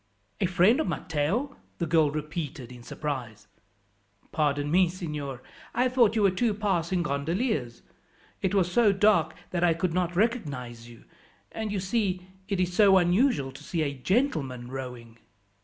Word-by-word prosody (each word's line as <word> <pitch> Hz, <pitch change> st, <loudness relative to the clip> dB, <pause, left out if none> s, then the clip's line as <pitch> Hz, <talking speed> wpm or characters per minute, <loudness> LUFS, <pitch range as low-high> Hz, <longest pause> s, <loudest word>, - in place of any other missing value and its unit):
"A -, -, +2 dB
friend 185 Hz, -, +4 dB
of 315 Hz, -, 0 dB
Matteo!" 165 Hz, -, -1 dB, 0.2 s
the 170 Hz, -, -1 dB
girl 160 Hz, -2 st, +3 dB
repeated 150 Hz, -4 st, -5 dB
in 125 Hz, -1 st, -11 dB
surprise. 120 Hz, -6 st, -5 dB, 0.8 s
"Pardon 145 Hz, -1 st, 0 dB
me, 180 Hz, 0 st, +4 dB
signor, 150 Hz, -7 st, -5 dB, 0.3 s
I 250 Hz, +2 st, +3 dB
thought 240 Hz, -4 st, +3 dB
you 215 Hz, -, +2 dB
were 195 Hz, -, +5 dB
two 210 Hz, +3 st, 0 dB
passing 185 Hz, -4 st, 0 dB
gondoliers. 140 Hz, -, -2 dB, 0.6 s
It 195 Hz, +1 st, 0 dB
was 180 Hz, -3 st, +2 dB
so 215 Hz, 0 st, +4 dB
dark 205 Hz, +2 st, +3 dB, 0.2 s
that 175 Hz, -1 st, -1 dB
I 170 Hz, -2 st, +4 dB
could 170 Hz, 0 st, -1 dB
not 175 Hz, -1 st, -1 dB
recognize 140 Hz, -, -2 dB
you; 115 Hz, -, -15 dB, 0.5 s
and, 220 Hz, -1 st, -4 dB
you 200 Hz, -, -1 dB
see, 190 Hz, -2 st, -1 dB, 0.2 s
it 195 Hz, -2 st, -1 dB
is 180 Hz, -1 st, 0 dB
so 195 Hz, 0 st, +6 dB
unusual 175 Hz, -, +2 dB
to 135 Hz, +2 st, -12 dB
see 165 Hz, 0 st, -1 dB
a 140 Hz, -2 st, -2 dB
gentleman 135 Hz, -, -1 dB
rowing." 125 Hz, -3 st, -7 dB
170 Hz, 155 wpm, -27 LUFS, 140-200 Hz, 0.8 s, so